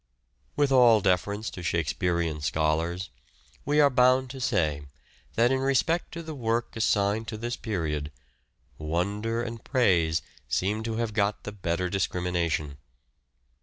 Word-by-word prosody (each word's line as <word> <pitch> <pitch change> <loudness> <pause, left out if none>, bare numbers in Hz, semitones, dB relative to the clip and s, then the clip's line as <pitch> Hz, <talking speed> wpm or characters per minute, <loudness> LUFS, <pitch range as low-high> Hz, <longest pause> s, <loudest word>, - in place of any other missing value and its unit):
With 145 -1 +2
all 120 -4 +6
deference 100 +3 0
to 90 - -8
Shakespearean 85 -1 -1
scholars, 80 +6 -1 0.5
we 145 +2 +2
are 145 -1 +6
bound 130 +1 +3
to 135 -1 -8
say 85 - +1 0.5
that, 120 +2 +4
in 135 - +2
respect 140 +6 +1
to 170 0 -6
the 160 -1 -6
work 120 -3 -2
assigned 110 0 +1
to 110 - -5
this 120 +2 -3
period, 75 -8 -3 0.7
wonder 100 +9 -1
and 115 -1 -6
praise 85 - +2 0.2
seem 105 +4 0
to 115 -1 -2
have 115 -1 -2
got 105 0 0
the 105 - -5
better 90 -3 -2
of 90 - -3
discrimination. 85 -6 -1
105 Hz, 140 wpm, -27 LUFS, 85-120 Hz, 0.7 s, all